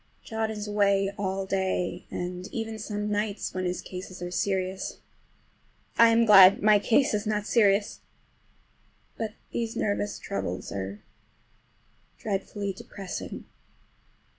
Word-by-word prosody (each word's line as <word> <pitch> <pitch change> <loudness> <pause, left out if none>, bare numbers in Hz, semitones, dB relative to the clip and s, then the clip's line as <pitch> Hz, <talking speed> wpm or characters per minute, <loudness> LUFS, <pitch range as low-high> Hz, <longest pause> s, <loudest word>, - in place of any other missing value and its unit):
John 220 -1 -2
is 210 -1 -5
away 200 -1 +2
all 195 -1 -2
day, 185 -2 -1
and 180 +1 -5
even 225 -1 -5
some 210 0 -3
nights 210 0 -2
when 185 0 -2
his 180 0 -2
cases 185 0 -8
are 175 0 -5
serious. 190 0 -2 1.0
I 230 0 +7
am 230 0 +4
glad 195 -3 +8
my 210 -1 +6
case 240 +5 +3
is 210 +1 -1
not 210 -1 0
serious! 205 -3 +2 1.2
But 220 -2 -4 0.2
these 230 0 -3
nervous 205 -1 -1
troubles 90 - -4
are 100 +1 -5 1.1
dreadfully 200 -1 -3
depressing. 190 0 -7
200 Hz, 120 wpm, -27 LUFS, 185-215 Hz, 1.2 s, glad